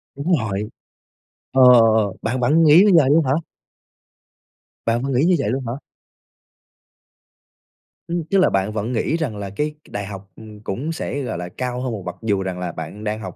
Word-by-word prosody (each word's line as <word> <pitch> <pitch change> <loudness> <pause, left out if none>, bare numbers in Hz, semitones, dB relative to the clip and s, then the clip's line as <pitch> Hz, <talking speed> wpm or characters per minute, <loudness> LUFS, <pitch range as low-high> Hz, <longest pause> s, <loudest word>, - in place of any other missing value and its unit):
Đúng 140 +6 -3
rồi. 105 -1 -3 0.8
Ờ, 130 0 +4
ờ, 120 - +7 0.2
ờ, 100 - -4
bạn 120 +3 -2
bạn 150 +7 +3
nghĩ 150 +1 +7
như - - +5
vậy 135 - +4
luôn 160 +1 +4
hả? 130 - +1 1.5
Bạn 115 +2 +1
vẫn 140 - -2
nghĩ 125 - +2
như 180 0 +4
vậy 105 - -1
luôn 130 +2 -2
hả? 115 - -2 2.4
Ừm, 170 0 -2
tức 185 +5 0
là 185 - +4
bạn 95 +2 0
vẫn 110 +2 -3
nghĩ 135 +7 0
rằng 135 -10 -3
là 100 -1 -5
cái 150 +10 -2
cái - - -20
đại 100 - -4
học, 95 -1 -9
ừm, 110 -1 -12
cũng 120 +10 -4
sẽ, 145 -3 -4
gọi 125 - -4
là, 90 0 -6
cao 125 +4 -4
hơn 130 - -3
một 105 -4 -6
bậc, 90 - -5
dù 105 -4 0
rằng 95 -1 -4
là 90 -1 -3
bạn 105 - -8
đang 110 0 -3
học, 110 - -8
115 Hz, 205 wpm, -21 LUFS, 100-140 Hz, 2.4 s, ờ